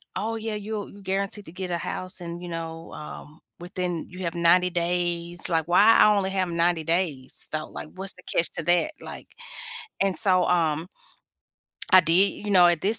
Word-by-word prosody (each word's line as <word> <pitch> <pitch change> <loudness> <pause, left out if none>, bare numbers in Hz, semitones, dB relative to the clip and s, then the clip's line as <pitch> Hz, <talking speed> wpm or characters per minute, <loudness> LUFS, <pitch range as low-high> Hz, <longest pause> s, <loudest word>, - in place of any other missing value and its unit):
"Oh 220 +4 -2
yeah, 220 -1 -4
you'll 210 0 -5
g 200 - -14
guaranteed 195 +2 -2
to - - -9
get 185 0 -5
a 170 - 0
house 185 +2 -4
and, 170 0 -6
you 175 - -7
know, 165 0 -6
um, 150 0 -10 0.2
within 175 -1 -4
You 185 - -11
have 170 - -3
90 180 +2 +4
days," 175 0 0
like, 165 -2 0
"Why 180 +4 +5 0.2
I 210 - +6
only 190 -1 0
have 190 -1 0
90 170 -1 +1
days, 165 -6 -2
though? 155 0 -3
Like, - - -7
what's 190 +1 -3
the 180 - -18
catch 170 - +3
to 165 - -2
that?" 175 - +3
Like, - - -10 0.8
and 195 -2 0
so, 185 -4 +3
um 165 -2 +1 1.0
I 185 - +10
did 185 +5 +2
You - - -2
know, 180 -3 +7
at 175 -2 +2
this 215 +6 +3
175 Hz, 195 wpm, -25 LUFS, 170-190 Hz, 1.0 s, I